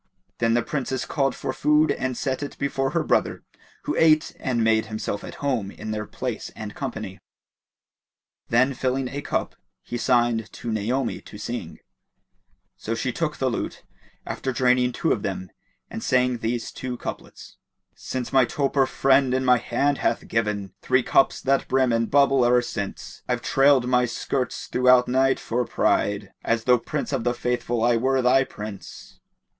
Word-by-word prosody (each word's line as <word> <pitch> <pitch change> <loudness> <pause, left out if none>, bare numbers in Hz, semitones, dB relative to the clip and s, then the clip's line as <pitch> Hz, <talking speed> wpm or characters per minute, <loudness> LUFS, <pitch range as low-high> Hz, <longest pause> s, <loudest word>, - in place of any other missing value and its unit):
Then 115 0 +2
the 120 - +2
Princess 130 -3 -3
called 135 -4 0
for 130 - -4
food 150 +3 +3
and 130 -1 -2
set 130 0 -2
it 145 - -6
before 135 -1 -1
her - - 0
brother, - - 0 0.4
who - - -2
ate 155 -1 +3
and 120 -4 0
made 110 -1 +2
himself 110 -1 -4
at - - -8
home 120 -8 0
in 105 +2 -7
their 105 0 -3
place 125 -4 -4
and 105 -1 -7
company. 100 -3 -6 1.3
Then 130 +4 +3
filling 130 0 -1
a 140 +2 -5
cup - - -2 0.3
he 120 - -5
signed 120 -3 +1
to 115 - -5
Naomi 115 +5 -1
to 105 - -12
sing; 120 +3 -6 1.0
so 115 - -3
she 125 +2 -1
took 150 +2 -2
the 130 - 0
lute, 120 - -3 0.4
after 130 - -3
draining 125 0 +2
two 160 +6 -1
of 105 - +1
them 95 -2 -4 0.4
and - - -7
sang 125 -1 +1
these 115 +1 -2
two 125 -1 -5
couplets, - - -8 0.4
"Since 130 0 -5
my 135 -1 +6
toper 135 +2 +1
friend 135 -1 +3
in 130 0 0
my 125 -1 +5
hand 140 +4 0
hath - - -1
given 105 -4 -1
* - - -51
Three 130 -1 +2
cups 135 - +3
that 135 +1 +1
brim 130 -2 +2
and 115 0 +1
bubble, 135 -2 +4
e'er 120 0 +4
since 100 -4 -6
I've 125 0 -1
trailed 135 -1 +4
my 125 0 +3
skirts 125 +2 -3
throughout 125 0 +4
night 130 +1 +2
for 120 +2 -1
pride 100 -3 0
* - - -41
As 115 -1 0
tho', 125 0 +4
Prince 145 +4 -4
of 130 -4 -1
the 120 +1 0
Faithful, 120 -1 -1
I 120 0 +4
were 130 +2 +1
thy 130 +2 +5
Prince!" 105 -5 -9
125 Hz, 175 wpm, -24 LUFS, 115-135 Hz, 1.3 s, my